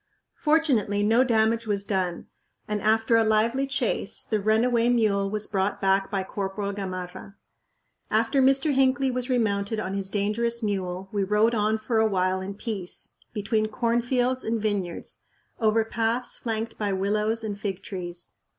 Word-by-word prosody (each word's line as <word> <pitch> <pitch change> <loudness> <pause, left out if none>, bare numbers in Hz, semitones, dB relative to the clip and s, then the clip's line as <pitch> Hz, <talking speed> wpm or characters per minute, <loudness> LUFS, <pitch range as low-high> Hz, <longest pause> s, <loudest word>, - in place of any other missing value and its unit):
Fortunately 265 -10 +2
no 225 +4 +4
damage 225 -1 +2
was 200 -1 -1
done, 185 -4 -1 0.4
and 210 -1 -2
after 220 +2 +3
a 225 - +4
lively 225 +5 +2
chase 275 - -2
the 215 -2 -1
runaway 230 +3 +3
mule 210 -5 +2
was 210 +1 -3
brought 195 -1 -1
back 195 0 +2
by 195 -1 -1
Corporal 200 +1 -3
Gamarra. 185 0 -6 0.7
After 225 +5 +2
Mr. 270 +3 +3
Hinckley 270 0 +3
was 250 +1 -3
remounted 215 -3 0
on 190 -3 -3
his 195 -1 -2
dangerous 225 +4 -1
mule 190 -2 -2
we 205 -2 0
rode 210 +4 +3
on 215 0 +1
for 220 +1 0
a 220 - +4
while 185 -2 0
in 195 +1 -5
peace, 200 -4 -5 0.2
between 215 +1 0
cornfields 245 +3 0
and 225 +1 -1
vineyards, 205 -5 -3 0.4
over 220 0 +3
paths 230 +2 -1
flanked 225 -1 -3
by 205 -2 0
willows 210 +4 0
and 205 -2 -4
fig 195 -3 -4
trees. 175 -2 -5
215 Hz, 155 wpm, -26 LUFS, 200-230 Hz, 0.7 s, no